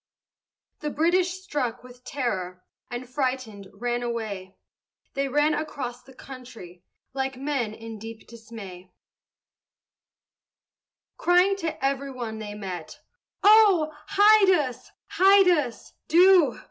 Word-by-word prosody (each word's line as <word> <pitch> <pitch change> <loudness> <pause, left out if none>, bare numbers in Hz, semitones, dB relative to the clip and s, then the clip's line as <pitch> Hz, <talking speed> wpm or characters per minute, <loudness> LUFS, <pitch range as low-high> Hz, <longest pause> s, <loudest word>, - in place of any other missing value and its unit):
The 300 - -3
British, 345 +5 +2
struck 250 -9 -3
with 250 0 -15
terror, 185 -11 -4 0.3
And 245 +1 -6
frighted, 255 -7 -3
ran 240 +4 -3
away: 215 -6 -5 0.6
They 275 0 -1
ran 295 +3 +2
across 265 -6 -5
the 265 +1 -18
country 235 -11 -12 0.3
Like 265 -1 -3
men 265 -6 -2
in 225 -1 -9
deep 225 +1 -10
dismay, 210 -6 -11 2.3
Crying 360 +3 +3
to 320 -7 -4
every 275 0 -1
one 235 -4 -6
they 210 -1 -7
met, 185 -5 -7 0.5
"Oh! 400 -7 +5
hide 410 0 +5
us! 295 -9 0 0.2
hide 390 0 +5
us! 290 -9 -1
do! 350 -5 +5
255 Hz, 110 wpm, -25 LUFS, 225-310 Hz, 2.3 s, Oh